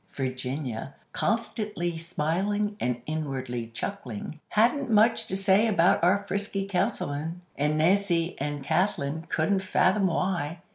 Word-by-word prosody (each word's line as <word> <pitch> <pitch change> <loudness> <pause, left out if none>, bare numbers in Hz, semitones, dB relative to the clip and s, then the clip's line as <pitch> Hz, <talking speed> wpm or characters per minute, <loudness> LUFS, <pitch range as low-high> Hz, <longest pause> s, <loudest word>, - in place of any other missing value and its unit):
Virginia, 130 -1 -4 0.2
constantly 210 -6 -1
smiling 180 +6 -1
and 125 -6 -1
inwardly 130 -6 -3
chuckling, 125 - -5
hadn't 245 +5 +2
much 225 +1 +4
to 190 - +1
say 195 +3 +4
about 175 -6 +3
our 200 +3 +3
frisky 195 0 0
Councilman; 175 -5 -1 0.2
and 150 +2 +1
Nancy 175 0 +2
and 145 0 -3
Kathlyn 160 -1 0
couldn't 175 +5 +1
fathom 190 +1 +2
why. 170 -2 -1
175 Hz, 115 wpm, -27 LUFS, 145-200 Hz, 0.2 s, much